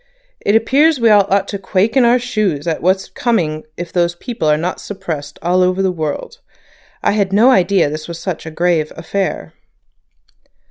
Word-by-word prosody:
It 205 Hz, -, +2 dB
appears 275 Hz, +6 st, +3 dB
we 230 Hz, -2 st, +4 dB
all 205 Hz, -2 st, +5 dB
ought 195 Hz, 0 st, +1 dB
to 200 Hz, -, -4 dB
quake 195 Hz, +4 st, 0 dB
in 260 Hz, -3 st, +5 dB
our 240 Hz, +1 st, +5 dB
shoes 215 Hz, -, -2 dB
at 165 Hz, -2 st, -2 dB
what's 190 Hz, +2 st, +1 dB
coming 165 Hz, -11 st, -1 dB
if 175 Hz, -1 st, -7 dB
those 175 Hz, -1 st, +1 dB
people 200 Hz, -3 st, -4 dB
are 150 Hz, 0 st, +3 dB
not 175 Hz, +4 st, -3 dB
suppressed 160 Hz, -8 st, -6 dB
all 180 Hz, +2 st, +2 dB
over 185 Hz, +1 st, +1 dB
the 190 Hz, -, +1 dB
world. 160 Hz, -, -5 dB, 0.6 s
I -, -, +3 dB
had 200 Hz, -2 st, 0 dB
no 225 Hz, +6 st, +5 dB
idea 190 Hz, -, +3 dB
this 155 Hz, +1 st, -5 dB
was 170 Hz, -1 st, -6 dB
such 170 Hz, -1 st, -5 dB
a -, -, -3 dB
grave 165 Hz, -1 st, 0 dB
affair." 190 Hz, +4 st, -3 dB
185 Hz, 185 wpm, -17 LUFS, 165-215 Hz, 0.6 s, all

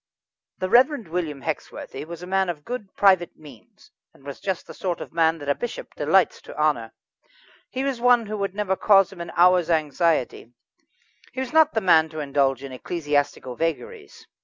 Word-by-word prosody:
The 185 Hz, -, -2 dB
Reverend 250 Hz, -, +4 dB
William 160 Hz, -5 st, -3 dB
Hexworthy 150 Hz, -2 st, -5 dB
was 170 Hz, +1 st, -8 dB
a -, -, -5 dB
man 190 Hz, 0 st, 0 dB
of 150 Hz, -4 st, -6 dB
good 240 Hz, -6 st, -6 dB
private 185 Hz, -4 st, +3 dB
means, 140 Hz, -8 st, -17 dB, 0.2 s
and -, -, -21 dB
was 140 Hz, -1 st, -8 dB
just 190 Hz, -3 st, -3 dB
the -, -, -11 dB
sort 180 Hz, -3 st, -3 dB
of -, -, -9 dB
man 165 Hz, -1 st, +2 dB
that 145 Hz, -2 st, -10 dB
a 140 Hz, -, +3 dB
bishop 240 Hz, +9 st, -7 dB
delights 165 Hz, +4 st, +2 dB
to -, -, -12 dB
honour. 145 Hz, -7 st, 0 dB, 0.8 s
He 260 Hz, -, -3 dB
was 270 Hz, -4 st, -2 dB
one 245 Hz, -2 st, +4 dB
who 215 Hz, +1 st, -5 dB
would 195 Hz, -1 st, -3 dB
never 205 Hz, -2 st, 0 dB
cause 195 Hz, -1 st, +4 dB
him 175 Hz, -, -9 dB
an 170 Hz, -, -6 dB
hour's 180 Hz, 0 st, +4 dB
anxiety; 155 Hz, -6 st, 0 dB, 0.8 s
he -, -, -5 dB
was 260 Hz, 0 st, -4 dB
not 315 Hz, -3 st, +4 dB
the 220 Hz, -, +1 dB
man 160 Hz, -4 st, +4 dB
to 155 Hz, 0 st, -7 dB
indulge 140 Hz, -2 st, 0 dB
in 135 Hz, -, -7 dB
ecclesiastical 145 Hz, -2 st, -2 dB
vagaries. 400 Hz, -, -5 dB
170 Hz, 185 wpm, -24 LUFS, 150-200 Hz, 0.8 s, Reverend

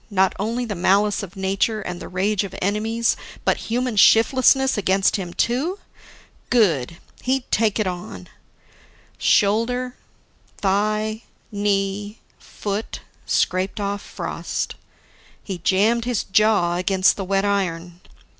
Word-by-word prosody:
Not 190 Hz, -2 st, +2 dB
only 230 Hz, +4 st, -1 dB
the 220 Hz, -, -4 dB
malice 200 Hz, +3 st, +2 dB
of 190 Hz, -3 st, -9 dB
nature 195 Hz, +3 st, 0 dB
and 180 Hz, -3 st, -5 dB
the -, -, -7 dB
rage 195 Hz, +3 st, 0 dB
of 200 Hz, -, -7 dB
enemies, 220 Hz, +4 st, 0 dB, 0.3 s
but -, -, +2 dB
human 245 Hz, 0 st, -1 dB
shiftlessness 260 Hz, +5 st, +5 dB
against 195 Hz, 0 st, +2 dB
him 180 Hz, -3 st, -5 dB
too? 270 Hz, -, 0 dB, 0.7 s
Good! 170 Hz, -, +2 dB, 0.2 s
He'd 260 Hz, 0 st, 0 dB
take 215 Hz, -2 st, +2 dB
it 215 Hz, -, +1 dB
on. 175 Hz, -, -6 dB, 0.9 s
Shoulder, 245 Hz, +5 st, +2 dB, 0.6 s
thigh, 215 Hz, +2 st, 0 dB, 0.3 s
knee, 205 Hz, +1 st, -1 dB, 0.2 s
foot 205 Hz, +1 st, -5 dB, 0.3 s
scraped 185 Hz, +3 st, 0 dB
off 200 Hz, 0 st, -2 dB
frost. -, -, -4 dB, 0.7 s
He 190 Hz, -3 st, -5 dB
jammed 215 Hz, +7 st, +2 dB
his 245 Hz, -4 st, -1 dB
jaw 195 Hz, -4 st, +2 dB
against 185 Hz, +1 st, +3 dB
the 195 Hz, -, -4 dB
wet 195 Hz, +1 st, 0 dB
iron. 180 Hz, -3 st, -2 dB
205 Hz, 120 wpm, -22 LUFS, 190-225 Hz, 0.9 s, shiftlessness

